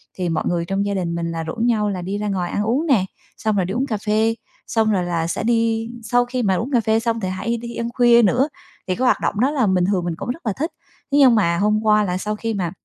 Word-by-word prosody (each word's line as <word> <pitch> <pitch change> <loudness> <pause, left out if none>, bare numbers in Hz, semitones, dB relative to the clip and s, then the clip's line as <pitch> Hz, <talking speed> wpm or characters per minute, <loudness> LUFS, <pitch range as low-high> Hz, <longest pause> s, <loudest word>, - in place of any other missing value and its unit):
thì 180 -2 -2
mọi 165 - -1
người 170 -1 0
trong 195 +2 -1
gia 200 - -1
đình 170 -3 -2
mình 170 0 -2
là 165 -1 -3
rủ 160 - -5
nhau 225 -3 +1
là 190 -3 -3
đi 190 +3 -3
ra 210 0 -3
ngoài 185 -3 -2
ăn 205 - -1
uống 260 +10 0
nè, 215 -10 +3 0.3
xong 215 -1 0
rồi 185 - +1
đi 190 - -4
uống 250 +4 0
cà 215 - -1
phê, 220 +2 +1 0.3
xong 220 -1 +1
rồi 185 -3 +1
là 170 -2 -1
sẽ 170 - -2
đi 230 -1 +1
sau 245 +2 +2
khi 245 0 -2
mà 190 -2 +2
uống 245 +9 -3
cà 240 -3 +3
phê 220 +1 +2
xong 230 0 -1
thì 190 -4 -2
hay 225 +6 -2
đi 235 0 -7
ăn 235 0 -3
khuya 240 -2 +5
nữa, 250 +8 +2 0.4
thì 185 - 0
cái 255 +5 -1
hoạt - - +3
động 205 - -1
đó 260 +5 +3
là 265 -7 +1
bình 185 -2 +2
thường 185 -2 0
mình 170 -2 -2
cũng - - -6
rất 260 +3 -5
là 215 - 0
thích. 315 - -3 0.4
Thế 280 - +3
nhưng 260 -4 +7
mà 170 -6 +2
hôm 210 +3 +2
qua 215 -1 +4
là 180 -2 -1
sau 210 +3 -3
khi 225 +1 -3
mà 180 -5 -2
215 Hz, 295 wpm, -21 LUFS, 185-235 Hz, 0.4 s, nhưng